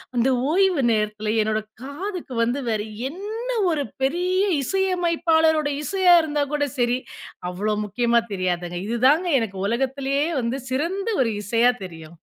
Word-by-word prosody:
அந்த 240 +2 +3 0.2
ஓய்வு 370 -4 +3
நேரத்தில 215 0 -1
என்னோட 215 0 0 0.2
காதுக்கு 335 +1 -6
வந்து 245 +4 0
வேற 215 -2 0 0.3
என்ன 425 +8 -6 0.2
ஒரு 295 -3 0 0.2
பெரிய 360 +6 +1 0.2
இசையமைப்பாளருடைய 325 -4 +2
இசையா 375 -1 +4
இருந்தா 295 -2 0
கூட 290 -1 +1
செரி 245 0 +2 0.5
அவ்ளோ 210 +4 -1
முக்கியமா 235 +3 +2
தெரியாது. 185 -2 0 0.3
இதுதாங்க 265 +10 +3
எனக்கு 210 -4 -4
உலகத்திலேயே 270 +5 0
வந்து 245 +3 -2
சிறந்த 345 - -1
ஒரு 230 -3 +1
இசையா 230 +4 +3
தெரியும். 165 -1 -11
270 Hz, 125 wpm, -23 LUFS, 225-335 Hz, 0.5 s, இசையா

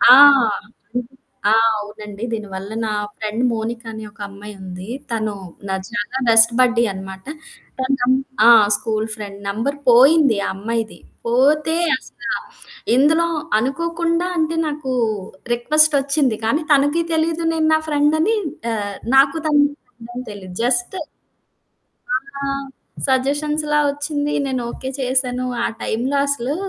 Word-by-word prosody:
ఆ! 245 +2 +9 1.4
ఆ! - - +5 0.3
అవునండి. 210 +1 -8
దీనివల్ల 200 -2 -5
నా - - -2 0.3
ఫ్రెండ్ 220 +2 -3
మోనిక 230 +1 -3
అనే 220 0 -7
ఒక - - -23
అమ్మాయుంది. 195 -2 -9 0.2
తను 215 -2 -1 0.4
నా 190 - -1 0.2
చాలా 235 +2 -3
బెస్ట్ 225 +1 +6
బడ్డీ 240 -2 +4
అనమాట. 190 0 -9 0.5
తన 260 - -1
నం 245 +1 +3 0.3
ఆ! - - +8 0.3
School 220 -1 -2
friend. 200 -2 -8
నంబర్ 230 +8 -2
పోయింది 270 0 +6
ఆ - - -1
అమ్మాయిది. 225 +2 -3 0.3
పోతే 295 +6 +3 0.2
అసల - - -15 0.7
ఇందులో 320 +5 +4 0.3
అనుకోకుండా 335 +6 -1
అంటే 320 0 0
నాకు 290 -3 -3 0.6
రిక్వెస్టొచ్చింది. 280 -1 +2
కానీ 285 +8 +1
తనకీ 290 +4 +3
తెలీదు 325 +1 0
నేను 320 -1 +1
నా 315 - +4
ఫ్రెండని 315 +8 +2 0.4
ఆహ్, 205 -2 -3 0.2
నాకు 275 +3 +5
తన 300 - +2 0.3
ఫ్రెండని 245 - -10
తెలీదు. 185 -3 -10
జస్ట్ 245 +8 0 1.5
ఆ! - - -1 0.6
సజెషన్స్‌లా 295 +3 +1
వచ్చింది. 290 0 -2
నేను 260 -2 -2
ఓకే 260 - -7
చేశాను. 255 -1 0 0.2
ఆ - - +2 0.2
టైంలో 250 +6 -1
అసలు 280 0 -1
255 Hz, 120 wpm, -20 LUFS, 220-295 Hz, 1.5 s, ఆ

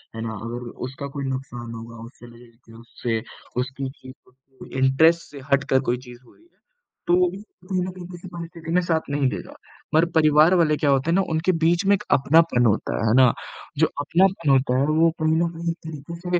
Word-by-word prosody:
है 115 - -5
ना? 115 -1 -4
अगर 120 +1 -6 0.2
उसका 135 +2 -7
कोई 140 - -3
नुकसान 130 -3 -5
होगा 115 0 -9
उससे 120 -1 -16
उससे, 115 -1 -4 0.4
उसकी 130 +1 -5
चीज़ों 130 -1 -15
के 130 0 -12
इंटरेस्ट 160 +6 +4
से 145 - -9
हट 140 0 +4
कर 130 - +4
कोई 125 - +1
चीज़ 125 -1 -13
हुई - - -22
ना, 335 - -26 0.6
तो 175 - +3
वो 180 0 +3
भी 195 +2 -9 0.3
कहीं 185 -1 -1
न 185 - -4
कहीं 180 -1 -10
किसी 175 0 -10
परिस्थिति 170 -1 -7
में 180 - +4
साथ 165 -2 0
नहीं 140 -1 +1
देगा। - - -7 0.4
मगर 160 +2 +5
परिवार 155 +2 +5
वाले 160 -4 +3
क्या 145 - +1
होते 135 +3 +2
हैं - - +3
ना, 195 - +4
उनके 160 +3 +1
बीच 170 +2 +1
में 200 - +5
एक - - -7
अपनापन 140 -2 +4
होता 110 -2 +1
है, 110 - 0
है 110 - +3
ना? 130 -2 +6 0.4
जो - - +4
अपनापन 170 +1 +2
होता 130 -1 +3
है 135 - +2
वो 160 +2 +4
कहीं 155 0 +2
न 170 +1 +2
कहीं 170 +1 -4
एक 165 - -7
तरीक़े 170 +4 -4
145 Hz, 210 wpm, -23 LUFS, 125-170 Hz, 0.6 s, ना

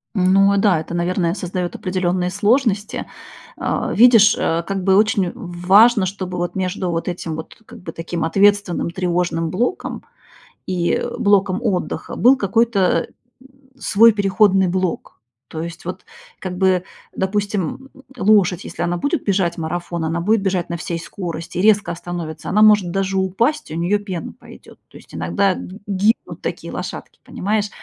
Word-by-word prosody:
Ну 195 +2 +4
да, 195 -4 +3
это, 160 +2 -7
наверное, 175 0 0
создает 180 -2 -4
определенные 180 -1 -1
сложности. 215 -2 0 0.5
А, - - -2
видишь, 225 -2 +6
э, 165 +1 0
как 195 +1 -3
бы 190 0 +4
очень 210 -3 +2
в 180 -7 -9
важно, 210 +1 +6
чтобы 185 -1 -5
вот 175 +1 -3
между 185 -1 -2
вот 165 0 -3
этим 170 -3 -4
вот 160 - -8
как 235 0 -13
бы 165 - -7
таким 165 +1 -4
ответственным, 200 0 +2
тревожным 175 -2 -1
блоком 240 - -2 0.6
и 175 -2 0 0.2
блоком 200 -1 +2
отдыха 200 -7 -2
был 255 +3 +5
какой-то, 200 -4 +1
э, - - -25 0.7
свой 230 0 +5
переходный 195 -1 +3
блок. 185 -1 -2 0.3
То 160 - -6
есть 170 0 -8
вот 180 - -6 0.3
как 180 -1 -5
бы, 185 -1 +2 0.3
допустим, 205 - -2 0.3
лошадь, 195 -5 +3
если - - -7
она 175 0 0
будет 285 - -1
бежать 185 -4 0
марафон, 170 +1 -4
она 160 +1 -1
будет 210 +5 +2
бежать 185 -3 -1
на 170 - -3
всей 170 0 -4
скорости, 170 -2 -6
резко 210 0 +3
остановится, 170 -2 -6
она 210 +3 +4
может 210 -5 +5
даже 195 +1 -1
упасть, 230 +11 0
и - - -5
у - - -3
неё 185 +5 +1
пена 190 -5 -6
пойдёт. - - -16
То - - -14
есть - - -18
иногда 200 -2 +1
ги 190 +3 -9
гибнут 205 +3 0
такие - - -5
лошадки, - - -7
понимаешь? 210 +1 -2
185 Hz, 155 wpm, -19 LUFS, 175-205 Hz, 0.7 s, видишь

